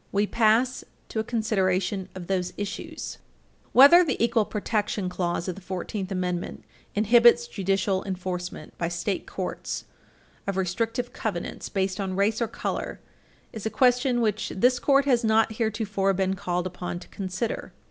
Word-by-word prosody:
We 200 +1 +2
pass 230 +4 +2 0.3
to 220 - -2
a - - +1
consideration 195 -4 0
of 185 -2 -6
those 185 -1 -1
issues. 205 -1 -5
I - - -36
Whether 285 +8 +9
the 295 -6 -1
equal 230 -2 +3
protection 210 -2 -1
clause 175 -1 -2
of 185 - -1
the 195 - -12
Fourteenth 190 +2 -4
Amendment 180 -2 -3 0.3
inhibits 235 - +6
judicial 195 - 0
enforcement 180 -4 -5
by 170 - 0
state 175 +3 -2
courts - - -4 0.6
of 195 -1 -1
restrictive 225 +6 -1
covenants - - -4
based 190 -1 -1
on 190 -2 -2
race 210 +4 +1
or 235 - +2
color 225 - -4 0.5
is 220 -2 -4
a - - 0
question 250 0 +3
which 215 -1 0
this 250 +5 +3
Court 275 -1 +4
has 250 -4 +3
not 220 0 +3
heretofore 210 -3 0
been 190 0 +1
called 180 -1 -2
upon 180 -1 -4
to 175 - -11
consider. 190 +3 -4
200 Hz, 155 wpm, -26 LUFS, 185-230 Hz, 0.6 s, Whether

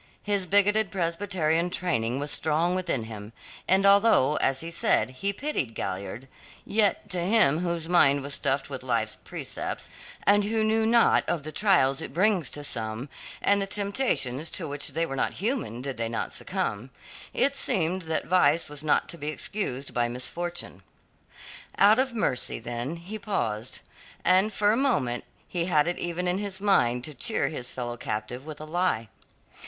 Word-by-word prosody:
His 200 -3 0
bigoted 205 +2 +3
Presbyterian 170 -2 0
training 125 -10 -1
was 145 +1 -2
strong 160 +3 +1
within 175 -10 -1
him, 110 -1 -9 0.3
and 190 +1 +3
although, 200 - +5
as 135 0 +1
he 165 +1 -6
said, 145 - +2
he 195 +10 -2
pitied 200 - -2
Galliard, 100 +6 -5 0.4
yet 210 -1 +2
to 180 - 0
him 170 -5 +4
whose 170 -2 -2
mind 145 -5 +4
was 140 0 -5
stuffed 135 0 -1
with 135 -2 -6
life's 115 -4 -1
precepts, - - -4 0.3
and 205 0 +4
who 220 +1 +1
knew 220 0 +2
naught 235 0 +4
of 165 -5 -1
the 155 - -6
trials 155 -8 +3
it - - -6
brings 185 -5 +2
to 145 - -5
some 115 0 -3 0.3
and 200 0 +3
the 195 - -2
temptations 195 - 0
to 165 - -3
which 145 0 -3
they 165 - -1
were 135 - -5
not - - 0
human 200 - -2
did 135 -3 -5
they 115 0 -2
not 115 - -3
succumb 110 +5 -3 0.4
it 280 0 +2
seemed 185 -7 0
that 160 -2 -2
vice 170 -3 +3
was 150 0 -5
not 155 - +2
to 170 - -5
be 145 - -4
excused 150 -4 -2
by 120 -1 +1
misfortune. 130 - -4 1.0
Out 210 +4 +6
of 260 0 +2
mercy 175 - -1
then 120 +6 -4
he 185 +6 -8
paused, 115 - -3 0.4
and 190 +4 +4
for 205 0 +2
a - - +2
moment 140 - 0 0.2
he 170 -2 -2
had 155 -3 +2
it 175 - -2
even 175 +1 -2
in 180 +2 0
his 200 -2 -4
mind 125 -12 +2
to 150 - -4
cheer 225 - +1
his 125 -6 -5
fellow 120 -1 -5
captive 120 +5 -5
with 155 -2 -7
a 155 - -7
lie. 160 -8 0
165 Hz, 175 wpm, -27 LUFS, 130-200 Hz, 1.0 s, Out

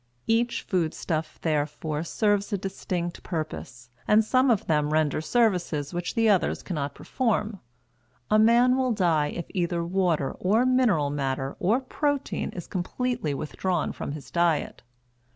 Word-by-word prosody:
Each 235 +1 +1
food 170 -4 -1
stuff, 160 -2 -3
therefore, 150 0 -1
serves 205 +3 0
a 200 - +1
distinct 180 -2 -4
purpose, 155 -7 -6 0.2
and 215 +1 +5
some 255 +3 +3
of 225 -5 +2
them 150 -2 +1
render 155 -1 +1
services 180 - +1
which 175 0 -3
the 225 -1 +3
others 200 -4 +2
cannot 145 -6 -3
perform. 220 -4 -1 0.7
A 215 - +5
man 240 +3 +5
will 260 -2 +1
die 165 -7 +2
if 170 - -5
either 175 -2 -1
water 175 -6 +1
or 215 +7 +3
mineral 235 - +3
matter 135 -1 -2
or 215 +8 +2
protein 285 +1 -2
is 175 - -6
completely 195 - -2
withdrawn 175 +3 -2
from 140 - -5
his 150 -2 -9
diet. 170 -3 +1
180 Hz, 145 wpm, -26 LUFS, 155-225 Hz, 0.7 s, and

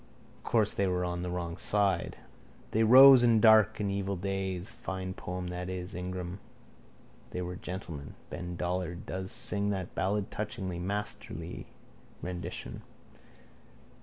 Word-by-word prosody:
Course 110 -3 +2
they 100 - +1
were 90 -1 0
on 90 0 -3
the 90 - -3
wrong 85 -1 -3
side. 100 -4 +1 0.5
They 110 - +3
rose 130 +2 +9
in 115 -2 +5
dark 110 -3 +6
and 100 -2 0
evil 100 0 -1
days. 95 +1 -3
Fine 95 -3 -5
poem 90 -1 -5
that 90 +1 -4
is: 90 -1 -5
Ingram. 90 +1 -5 0.9
They 90 - -4
were 90 +1 -5
gentlemen. 85 -6 -7 0.2
Ben 90 0 -5
Dollard 90 0 -3
does 95 0 -4
sing 100 0 -1
that 95 -3 -3
ballad 100 +1 -1
touchingly. 100 -5 -4
Masterly 100 +3 -4 0.5
rendition. 90 -1 -6
95 Hz, 135 wpm, -30 LUFS, 90-100 Hz, 0.9 s, rose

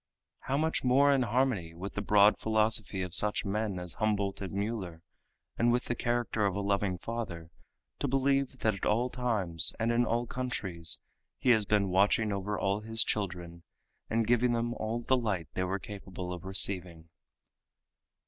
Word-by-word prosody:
How 135 - -2
much 160 +2 -1
more 140 +3 +4
in 135 - +2
harmony 115 -8 0
with 95 +4 -7
the 105 - -3
broad 105 +1 +4
philosophy 110 -3 0
of 90 -2 -6
such 105 0 +7
men 105 -1 -2
as 90 -1 -3
Humboldt 100 -2 -1
and 95 - -5
Mueller, 100 -5 -4 0.6
and 120 +1 +3
with 120 +1 0
the - - -1
character 120 -2 -1
of 100 - -3
a - - -2
loving 100 -2 -1
Father, 90 -6 -6 0.5
to - - -1
believe 135 0 0
that 110 - +2
at 95 - -5
all 120 +4 +1
times 105 -9 +2
and 115 +1 +1
in 120 +1 +2
all 120 0 -1
countries 95 -11 -1 0.3
He 125 - +2
has 110 -4 +3
been 100 -2 +2
watching 105 +3 +2
over 100 +1 -3
all 100 +1 0
His 115 +1 +1
children 90 -4 -4 0.5
and 115 0 +1
giving 120 +1 +2
them 120 0 -1
all 115 +1 -3
the 130 - +2
light 105 - -2
they 95 - -1
were 95 +2 -2
capable 95 -3 -8
of 90 +1 -9
receiving. 90 -4 -1
105 Hz, 175 wpm, -30 LUFS, 95-120 Hz, 0.6 s, such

